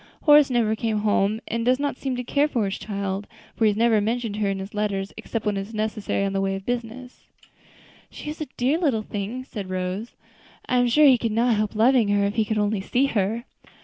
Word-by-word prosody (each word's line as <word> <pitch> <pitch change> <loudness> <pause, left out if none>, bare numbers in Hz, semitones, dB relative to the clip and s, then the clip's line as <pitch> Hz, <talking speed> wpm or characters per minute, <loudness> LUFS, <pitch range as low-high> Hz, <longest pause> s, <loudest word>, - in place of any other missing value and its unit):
Horace 295 -2 +7
never 230 -3 +1
comes 215 -1 -1
home, 210 +1 +1
and 230 0 -2
does 255 +2 +2
not 285 -2 -1
seem 265 -1 -3
to 250 - -3
care 285 +4 +2
for 235 -8 -1
his 195 - -3
child, 200 -1 -4 0.3
for 225 - +1
he 210 - +4
never 220 0 +3
mentions 225 0 -2
her 210 -2 0
in 195 - -1
his 195 +1 -7
letters, 200 -2 -2
except 225 -2 -5
when 205 -1 0
it - - 0
is 210 +3 -9
necessary 215 -2 -1
in 195 - -2
the 195 - 0
way 195 0 0
of 195 0 -7
business." 245 +1 -5 0.8
"She 300 - -7
is 310 - -9
a 305 - -3
dear 270 +7 +1
little 265 -11 +1
thing," 210 +5 -5
said 205 -7 -7
Rose. 185 +4 -4 0.5
"I 250 - +1
am 245 0 +3
sure 300 +6 +5
he 260 -4 +6
could 230 -1 -1
not 230 +1 +2
help 210 0 -1
loving 235 +1 +4
her, 205 0 +2
if 200 - -1
he 220 -1 +1
could 220 +1 -2
only 205 -1 0
see 250 +7 +1
her." 215 +3 0
220 Hz, 235 wpm, -24 LUFS, 205-245 Hz, 0.8 s, Horace